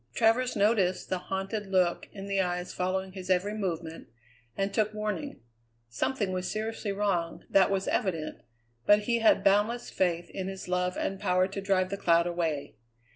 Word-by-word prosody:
Travers 235 +3 +3
noticed 200 -3 +2
the 185 - 0
haunted 195 +3 -3
look 185 -2 +1
in 195 -1 -8
the 195 -1 +1
eyes 180 -1 -2
following 190 +1 -1
his 185 -1 -8
every 190 +3 +2
movement, 170 -6 -4 0.5
and 195 0 -1
took 215 -1 +1
warning. 215 +7 -3 0.5
Something 195 - -1
was 185 0 -2
seriously 220 -1 -3
wrong, 195 -4 -1
that 195 -1 +5
was 195 -1 -1
evident; 165 -6 -1 0.5
but 205 0 +6
he 235 +2 +1
had 220 -3 +4
boundless 210 +5 +2
faith 175 -2 0
in 190 -1 -4
his 190 -1 -6
love 180 0 0
and 195 0 -2
power 185 -2 +2
to 195 +1 -5
drive 190 -1 +1
the 200 - -2
cloud 170 -3 +3
away. 165 -9 -2
190 Hz, 170 wpm, -29 LUFS, 180-205 Hz, 0.5 s, but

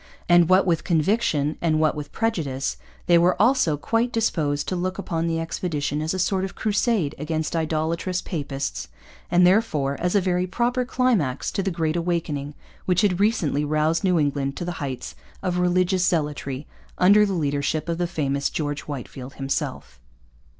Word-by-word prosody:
And, 175 -1 +5
what 185 +1 +5
with 170 -3 +1
conviction 160 -4 +1
and 155 -2 +2
what 155 -1 +3
with 150 -1 -7
prejudice, 145 - -1 0.3
they 170 -1 +5
were 175 +2 +3
also 230 - +3
quite 230 +10 0
disposed 155 -11 0
to 185 - -1
look 185 +1 -2
upon 170 -4 -2
the 165 -1 0
expedition 155 -3 -2
as 155 +1 -1
a - - -2
sort 185 +1 0
of 190 - -5
Crusade 210 - 0
against 155 +1 -2
idolatrous 165 +3 -1
papists, 140 -6 -4 0.4
and 180 +1 +5
therefore 175 -9 +2
as 180 +3 0
a - - +6
very 180 -1 0
proper 245 +6 0
climax 220 - 0
to - - -1
the 195 - -1
Great 165 -3 -1
Awakening 165 -4 -2 0.3
which 180 +1 +3
had 195 -4 +2
recently 200 -9 +1
roused 155 +3 +1
New 180 -2 +3
England 140 -2 0
to 175 - -4
the 175 - -2
heights 135 -3 -4 0.3
of 180 -1 0
religious 180 +1 +2
zealotry 145 -4 -2 0.3
under 205 +3 +6
the 200 -2 0
leadership 145 -1 -1
of 170 0 -2
the 175 - +1
famous 140 -4 -1
George 145 -2 -3
Whitefield 135 -2 -7
himself. 135 0 -4
170 Hz, 170 wpm, -24 LUFS, 150-185 Hz, 0.4 s, a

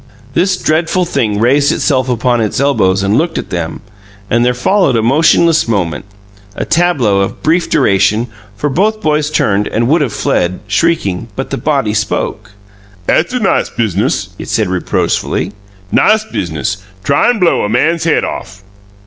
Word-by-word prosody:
This 180 +3 +1
dreadful 165 +3 0
thing 105 -11 -1
raised 140 +5 +3
itself 130 -3 0
upon 120 0 +1
its 110 +1 -1
elbows 100 -9 +2
and 100 +2 +1
looked 165 +1 -1
at - - -5
them, 85 -3 -4 0.5
and 120 +1 +3
there 125 0 +1
followed 190 +5 +2
a 115 - +1
motionless 160 +5 +3
moment 95 -7 -1 0.5
a - - -3
tableau 160 - +2
of 100 - -3
brief 170 +3 +1
duration, 105 -2 +2 0.3
for 145 - -2
both 205 +10 0
boys 150 -1 +1
turned 105 -8 +1
and 115 +1 0
would 160 +2 +3
have 135 -6 0
fled, 90 -2 -1
shrieking, 105 - 0
but 135 - -5
the 135 - -1
body 135 -9 0
spoke: 105 -1 -3 0.5
"'At's - - +2
a 250 - 0
nice 205 - +1
business!" 100 -3 -1
it - - -7
said 110 -4 0
reproachfully. 95 +1 -1 0.4
"Nice 215 0 +3
business! 85 - -3 0.3
Tryin' 185 +12 +2
blow 180 -4 +2
a 105 - -1
man's 160 +9 +1
head 165 - +2
off!" 95 +2 -6
125 Hz, 160 wpm, -13 LUFS, 100-160 Hz, 0.5 s, raised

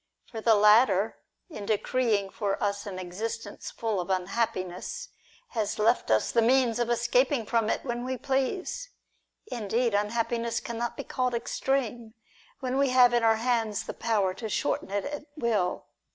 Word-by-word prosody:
For 225 - -5
the 225 0 +5
latter, 210 0 +4 0.3
in 215 - -8
decreeing 215 -2 +1
for 200 -2 -1
us 200 0 -1
an 190 -2 -5
existence 195 +6 -5
full 220 -4 -2
of 175 - -7
unhappiness, 190 - -2 0.4
has 220 -4 -2
left 225 +3 +2
us 110 -1 +2
the 235 - +3
means 245 0 +3
of 240 -1 0
escaping 275 - +2
from 225 -1 +1
it - - -1
when 240 -1 -3
we 260 0 -3
please. 280 - -2 0.6
Indeed, 230 +1 0
unhappiness 230 +3 0
cannot 235 0 -4
be - - -4
called 250 -1 -1
extreme, 235 -1 -2 0.5
when 260 +1 -1
we 280 -1 +3
have 250 -1 +6
in 240 - +3
our 225 0 +5
hands 225 -2 0
the - - -6
power 210 -5 0
to 220 +2 -6
shorten - - -1
it 200 0 -2
at 290 +1 -5
will. 215 -9 0
230 Hz, 160 wpm, -28 LUFS, 210-250 Hz, 0.6 s, have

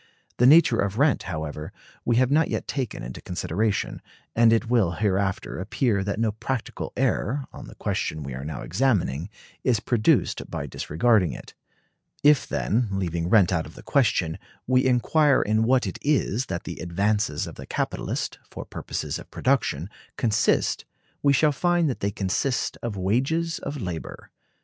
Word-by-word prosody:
The 125 - +5
nature 145 -5 +6
of 100 +1 0
rent, 140 +1 +3
however, 75 -2 -5 0.3
we 120 - +2
have 130 +2 +3
not 160 +2 +4
yet - - -3
taken 130 - -3
into 60 +1 -7
consideration; 95 +5 -2 0.3
and 115 0 +6
it 115 +1 +2
will 110 -8 +2
hereafter 100 -1 -1
appear 105 +1 0
that 100 +1 -2
no 115 -1 +2
practical 115 +3 -4
error, 135 +6 0
on - - -9
the - - -12
question 75 -1 -2
we 70 -1 -6
are 65 +2 -6
now 75 +2 -5
examining, 90 - 0 0.3
is 120 -5 +2
produced 110 0 +1
by - - -4
disregarding 95 +3 +1
it. - - -10 0.7
If, 145 -1 +5
then, 115 +3 0
leaving 85 -3 -2
rent 100 -3 +5
out 80 -3 0
of 80 - -14
the - - -12
question, 95 - +1 0.3
we 130 +1 +3
inquire 135 +3 +3
in 110 +1 +2
what 125 0 +3
it 95 - -5
is 130 -4 +1
that 85 -2 -4
the 85 - -7
advances 100 -1 0
of - - -8
the - - -10
capitalist, - - -3
for - - -8
purposes - - -4
of - - -12
production, 120 - 0 0.3
consist, 110 -4 +1 0.4
we 140 - +4
shall 150 +2 +4
find 175 +3 +2
that - - -6
they 100 - 0
consist 105 +7 -1
of 115 -4 -4
wages 135 - 0
of 145 0 -5
labor. 90 -6 -6
110 Hz, 165 wpm, -25 LUFS, 90-130 Hz, 0.7 s, nature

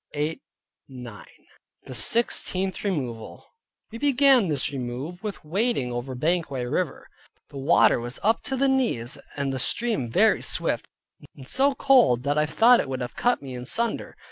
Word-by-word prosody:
THE 150 +2 -2 1.5
SIXTEENTH 190 - 0
REMOVAL 130 - -4 0.5
We 230 - -8
began 275 -5 +4
this 145 -4 -1
remove 135 +7 -5
with 210 -7 -6
wading 190 - -1
over 125 +2 -5
Banquang 150 -3 -1
river: 175 -7 -2 0.4
the 140 - -8
water 135 -2 +4
was 120 +2 -5
up 220 +2 +2
to 270 - -2
the 275 +1 +2
knees, 235 - 0 0.2
and 140 -1 -1
the 130 - -3
stream 215 - 0
very - - +3
swift, - - -2 0.5
and 130 -2 -12
so 275 - +2
cold 245 - +4
that 145 +2 +1
I 150 - +1
thought 235 +9 +5
it - - -2
would 130 -1 -4
have 125 - -5
cut 245 -10 +1
me 135 -2 -7
in 125 0 -7
sunder. 230 - -1
155 Hz, 155 wpm, -25 LUFS, -, 1.5 s, thought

